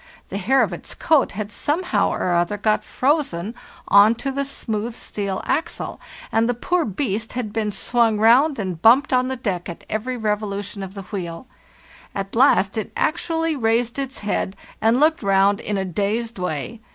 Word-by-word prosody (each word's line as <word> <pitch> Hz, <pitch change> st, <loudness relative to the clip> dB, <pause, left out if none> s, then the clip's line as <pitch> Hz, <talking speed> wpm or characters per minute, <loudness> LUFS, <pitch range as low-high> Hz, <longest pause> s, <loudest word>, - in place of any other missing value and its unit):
The 200 Hz, -, -3 dB
hair 255 Hz, +7 st, +3 dB
of 195 Hz, -5 st, -2 dB
its 175 Hz, -, -7 dB
coat 310 Hz, -5 st, +2 dB
had 210 Hz, +1 st, -5 dB
somehow 340 Hz, -, 0 dB
or 180 Hz, -, -1 dB
other 175 Hz, +4 st, +1 dB
got 215 Hz, +1 st, +1 dB
frozen 255 Hz, -, 0 dB, 0.3 s
on 205 Hz, +3 st, +6 dB
to 275 Hz, +3 st, -3 dB
the 280 Hz, +1 st, -1 dB
smooth 230 Hz, -4 st, -3 dB
steel 200 Hz, -5 st, -4 dB
axle, 320 Hz, -, -2 dB, 0.3 s
and 225 Hz, +1 st, +2 dB
the 245 Hz, -, +1 dB
poor 350 Hz, +8 st, 0 dB
beast 220 Hz, 0 st, -2 dB
had 240 Hz, -5 st, -4 dB
been 215 Hz, -2 st, -1 dB
swung 225 Hz, +2 st, +1 dB
round 250 Hz, +8 st, +5 dB
and 185 Hz, -6 st, -4 dB
bumped 260 Hz, +6 st, +5 dB
on 255 Hz, 0 st, +3 dB
the 260 Hz, -, -2 dB
deck 195 Hz, -9 st, -3 dB
at 170 Hz, -, -9 dB
every 245 Hz, +4 st, -2 dB
revolution 210 Hz, -2 st, -3 dB
of 190 Hz, +1 st, -7 dB
the 195 Hz, -, -6 dB
wheel. 175 Hz, -1 st, -6 dB, 0.7 s
At 195 Hz, +1 st, -4 dB
last 225 Hz, -5 st, +4 dB
it 215 Hz, -, -5 dB
actually 325 Hz, 0 st, 0 dB
raised 235 Hz, 0 st, 0 dB
its 270 Hz, -1 st, -4 dB
head, 205 Hz, -2 st, -1 dB, 0.3 s
and 225 Hz, +3 st, +3 dB
looked 315 Hz, +2 st, +3 dB
round 200 Hz, 0 st, +3 dB
in 210 Hz, -3 st, -2 dB
a 190 Hz, -, -1 dB
dazed 210 Hz, +5 st, -2 dB
way. 180 Hz, +6 st, -4 dB
220 Hz, 175 wpm, -22 LUFS, 200-255 Hz, 0.7 s, on